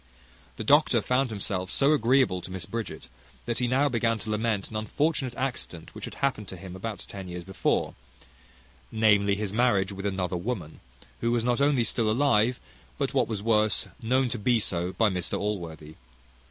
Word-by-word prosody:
The - - -5
doctor - - +5
found 125 +1 +1
himself 95 -3 -2
so 140 +2 +3
agreeable 125 -7 +3
to - - -9
Miss 95 -1 -6
Bridget, 115 -1 -5 0.4
that 120 -1 -1
he 125 - +1
now 135 +4 +3
began 115 -3 +1
to 110 0 -4
lament 105 -2 -1
an - - -8
unfortunate 130 +3 -1
accident 125 -11 -4
which - - -6
had - - -8
happened 130 -7 -1
to 95 - -8
him 90 0 -9
about 105 +3 -5
ten 95 -2 -8
years 90 0 -6
before; 95 +1 0 1.0
namely, 105 -2 +4
his 100 -1 -3
marriage 105 -5 +2
with 100 +1 -4
another 95 -2 -1
woman, 90 -5 -4 0.4
who 115 - 0
was 120 -1 +1
not 125 +2 +1
only 140 -4 +3
still 115 -1 0
alive, 120 -1 +3 0.4
but, - - -1
what - - +2
was 105 -3 -4
worse, 110 -2 +2
known 130 +3 +2
to 120 - -3
be 120 +2 +3
so 90 -3 -1
by 110 +5 +3
Mr 90 -4 -1
Allworthy. 85 -7 -4
110 Hz, 180 wpm, -27 LUFS, 95-120 Hz, 1.0 s, doctor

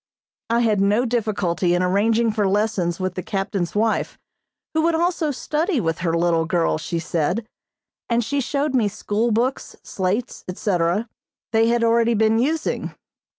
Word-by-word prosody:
I 235 +1 +2
had 215 -4 +2
no 210 +5 +3
difficulty 200 -7 0
in 180 - +1
arranging 220 +5 +2
for 210 -2 0
lessons 195 -4 0
with 185 -1 -2
the 185 - -4
captain's 195 -2 -3
wife, 220 +1 0 0.6
who 315 - +2
would 330 +1 +2
also 335 -2 0
study 300 +4 -1
with 165 -5 -1
her 170 -1 0
little 165 -1 +2
girl, 165 -2 +1
she 170 +2 -3
said, 170 +6 -1 0.6
and 235 0 +2
she 285 +4 0
showed 280 +2 -1
me 240 -5 +3
school 210 +3 -1
books, 240 +4 -1
slates, 200 +6 -2
etc., 180 +2 0 0.4
they 225 0 +3
had 235 0 +2
already 230 0 +3
been 220 +1 +3
using. 305 +6 -1
220 Hz, 155 wpm, -22 LUFS, 185-235 Hz, 0.6 s, no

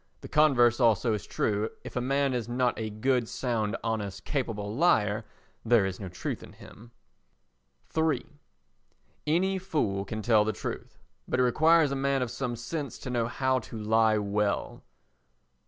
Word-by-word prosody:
The - - -8
converse 130 -6 +4
also 115 -1 +3
is 105 -4 -4
true; 105 +1 0
if - - -9
a 125 - 0
man 135 +1 +1
is 120 -2 -3
not 125 0 +1
a 110 -1 -4
good, 120 +2 0
sound, 115 -4 -1
honest, 110 -4 -3
capable 110 -7 -3
liar 110 -9 +2 0.4
there 115 -3 +4
is 95 -1 -4
no 95 -3 -6
truth 90 - -5
in - - -12
him. 115 +2 -14 1.1
iii 160 -1 +1 1.0
Any 190 +5 +2
fool 125 - -1
can 110 +2 -5
tell 110 -2 +4
the 110 +1 -1
truth, - - -6 0.3
but - - 0
it - - +5
requires 155 +4 +4
a - - -1
man 135 -1 +1
of 120 - -4
some 125 -3 -3
sense 140 +5 -5
to 125 - -6
know 120 -2 0
how 130 +1 0
to 115 -1 -9
lie 110 0 +3
well. 105 0 -1
120 Hz, 165 wpm, -28 LUFS, 110-135 Hz, 1.1 s, it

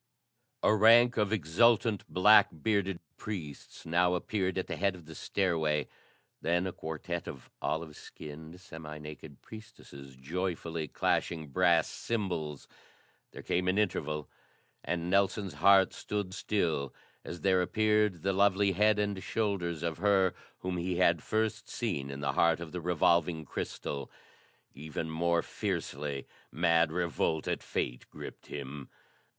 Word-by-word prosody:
A - - +5
rank 115 +3 +6
of 105 -2 +1
exultant, 105 +3 +3
black 105 +2 +7
bearded 100 -4 +1 0.2
priests 80 -10 -7
now 90 +2 +2
appeared 95 +1 -1
at 95 - -1
the - - -4
head 100 -1 +1
of 85 -3 -13
the 80 - -10
stairway, 80 -3 0 0.5
then 85 +2 +1
a 95 - -2
quartet 80 +2 -5
of 65 - -9
olive 80 -1 -2
skinned, 80 +4 -10
semi 80 -4 -9
naked 75 -1 -10
priestesses 105 -12 -12
joyfully 85 +2 -3
clashing 80 -1 -1
brass 65 - +3
cymbals. 85 -10 -3 0.6
There - - -10
came 90 +1 0
an 95 +2 +2
interval 75 -7 -1 0.6
and 85 -1 -2
Nelson's 100 -1 +1
heart 95 +5 +5
stood 100 -3 -4
still 80 -11 -1 0.3
as 85 - -7
there 95 -2 +3
appeared 105 -2 +1
the 95 0 +1
lovely 100 0 +3
head 105 +3 +3
and 100 -2 -1
shoulders 90 -8 -2
of 85 -1 -2
her 95 -2 +3 0.3
whom 90 -1 -2
he 90 +1 -1
had 85 -3 +3
first 110 0 -1
seen 90 - -2
in 70 0 -6
the 70 - 0
heart 85 -1 +3
of 85 -2 -7
the 90 - -5
revolving 85 -1 +2
crystal. 70 0 -5 0.6
Even 80 +2 -5
more 85 +1 +1
fiercely, 70 -1 -3 0.3
mad 85 0 +3
revolt 85 -2 -1
at - - -1
fate 60 +1 -3
gripped - - -10
him. 70 -1 -7
85 Hz, 140 wpm, -31 LUFS, 80-100 Hz, 0.6 s, black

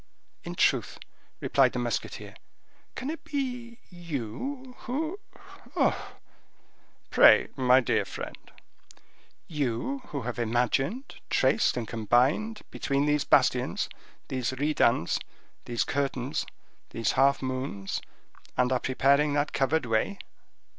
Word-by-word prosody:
"In - - -6
truth," - - +2 0.4
replied - - +3
the - - -3
musketeer, - - -3 0.6
"can 265 +4 -3
it 325 - -7
be 250 -5 -4
you—who—oh!" 250 - -5 1.9
"Pray—my 130 -1 +6
dear 120 - +1
friend—" - - -7 1.1
"You 150 - -2
who 140 -4 -4
have 125 0 -4
imagined, 125 - 0
traced, - - +3
and 115 -2 -3
combined 130 - +1
between 140 0 0
these 150 -1 +2
bastions, - - +2 0.4
these 130 -1 -2
redans, 130 - +2 0.5
these 120 -1 0
curtains, 135 -1 -2 0.4
these 115 - 0
half 135 +1 +3
moons; 130 -7 -3 0.6
and 125 0 +3
are 130 - +2
preparing 140 +3 +3
that 145 +1 0
covered 135 +2 +1
way?" 115 - 0
140 Hz, 100 wpm, -28 LUFS, 125-200 Hz, 1.9 s, Pray—my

